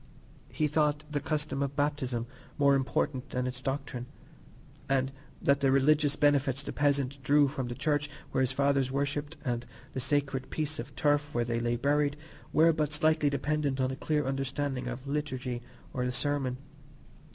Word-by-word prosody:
He 155 - 0
thought 150 0 +1
the 145 - 0
custom 150 -1 -1
of 140 0 -1
baptism 140 -5 0 0.3
more 140 -1 +5
important 135 0 0
than 125 0 -1
its 125 0 -4
doctrine, 135 -2 -3 0.8
and 135 -1 +2 0.3
that 140 0 +4
the 135 - +3
religious 145 +2 +4
benefits 140 -2 +2
the - - -5
peasant 140 -1 +1
drew 145 +1 +5
from 135 -3 -3
the 120 - -4
church 145 +2 0 0.2
where - - +1
his 130 0 +2
fathers 140 -1 +2
worshipped 145 +2 -1
and 120 -2 -1 0.3
the - - -2
sacred 135 0 0
piece 155 0 -2
of 125 +3 -7
turf 145 0 +1
where 120 -1 +2
they 115 0 -1
lay 120 0 0
buried 145 +3 +1 0.3
were 165 +1 +5
but 150 -2 0
slightly 155 0 +3
dependent 140 0 0
on 130 0 +1
a - - -3
clear 150 +1 0
understanding 135 -1 -2
of 125 +2 -5
the 140 - -4
Liturgy 130 -4 -2 0.3
or 125 - -1
the 125 - 0
sermon. 130 -1 -1
140 Hz, 175 wpm, -30 LUFS, 130-145 Hz, 0.8 s, more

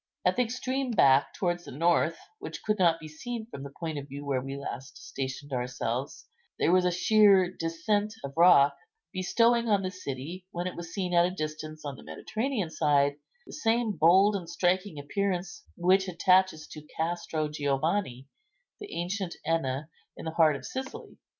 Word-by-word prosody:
At - - +3
the - - +2
extreme 255 +2 -2
back, 140 - +4
towards 175 -2 -1
the - - -9
north, 165 +2 +2 0.2
which - - -7
could 215 -1 0
not 170 -3 +4
be 155 - -9
seen 225 +9 -6
from 140 -11 -9
the 140 - -7
point 155 +1 -5
of 140 - -9
view 140 +1 -8
where 135 -2 0
we 135 +1 -6
last 135 -1 -7
stationed 135 +1 -6
ourselves, 125 +2 -3 0.3
there - - +2
was 185 0 +4
a 180 - +3
sheer 190 -1 +4
descent 205 +6 -1
of 140 - -6
rock, 165 -5 +6 0.4
bestowing 230 +5 +2
on 200 -2 +3
the 185 - -2
city, 175 +1 -7
when 175 0 -4
it 185 - -4
was 170 -1 -7
seen 180 -2 -2
at 170 0 +5
a - - -2
distance 155 -3 -6
on 140 -2 -5
the - - -13
Mediterranean 220 -7 -3
side, 145 -2 +2 0.3
the - - -12
same 230 -4 +1
bold 190 +4 +5
and 175 -4 -5
striking 180 0 0
appearance 195 - -3
which 190 +2 +3
attaches 185 -2 +3
to 155 - -9 0.2
Castro 160 -1 -1
Giovanni, 145 -1 -1 0.5
the 415 -1 -9
ancient 180 +1 -3
Enna, 150 -3 -1 0.3
in - - -8
the 160 - -2
heart 160 -2 +4
of 130 -2 -8
Sicily. 410 - -7
175 Hz, 175 wpm, -28 LUFS, 145-200 Hz, 0.5 s, rock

